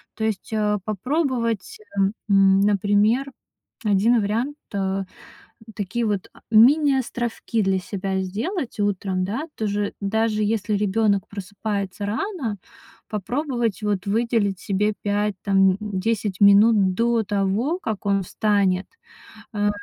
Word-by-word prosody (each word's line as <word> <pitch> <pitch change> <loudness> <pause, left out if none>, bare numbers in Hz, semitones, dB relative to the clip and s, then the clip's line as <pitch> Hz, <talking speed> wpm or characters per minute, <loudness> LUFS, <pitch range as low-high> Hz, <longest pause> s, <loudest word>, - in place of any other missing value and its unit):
То 220 - -2
есть, 215 -2 -3
э, 210 -1 +1
попробовать, 245 - -1 0.2
э, - - +3 0.3
м, 195 -1 +5
например, 205 +6 +2 0.5
1 215 +4 +3
вариант: 230 +8 -1 0.2
э, 195 -1 -1 0.7
такие 215 +4 -2
вот, 205 -3 -2
а, - - -19
мини-островки 240 -2 +3
для 190 -1 +1
себя 190 0 -3
сделать 230 - -4
утром, 190 -2 -1
да. 230 +11 -3
Тоже, 205 -1 -2
даже 215 +1 0
если 210 0 0
ребёнок 205 -1 +1
просыпается 200 0 -4
рано, 230 - -3 0.5
попробовать 240 - -2
вот 205 -2 -1
выделить 215 -3 +1
себе 210 +2 0
5, 205 0 0
там, 195 -1 +4
м, 185 - -2
10 205 -1 -2
минут 200 -1 +6
до 230 0 +2
того, 205 - 0
как 215 - -4
он 200 -1 +2
встанет, 195 -1 +1 0.7
а, 205 0 +1
210 Hz, 120 wpm, -23 LUFS, 195-230 Hz, 0.7 s, минут